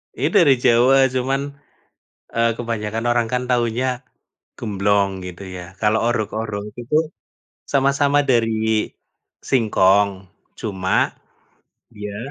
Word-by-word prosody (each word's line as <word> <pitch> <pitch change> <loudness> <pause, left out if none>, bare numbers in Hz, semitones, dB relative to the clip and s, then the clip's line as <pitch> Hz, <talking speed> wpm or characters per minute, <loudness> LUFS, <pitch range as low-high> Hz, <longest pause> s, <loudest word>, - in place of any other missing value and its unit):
Itu - - -1
dari 145 -7 +5
Jawa 125 +3 +5 0.2
cuman, 135 +2 0 0.9
eee, 115 0 +2
kebanyakan 115 -1 -3
orang 120 -1 +2
kan 125 0 0
taunya, 120 0 +1 0.7
gemblong 100 -2 +1
gitu 90 +1 -8
ya 90 0 -9
kalau 110 0 +2
orog-orog 110 -2 -3
itu, 120 +5 -2 0.8
sama-sama 140 +1 +2
dari 110 -4 +1 0.6
singkong, 100 -5 +3 0.5
cuma, 95 -3 0 0.8
dia, 105 -1 -7
115 Hz, 100 wpm, -20 LUFS, 105-125 Hz, 0.9 s, dari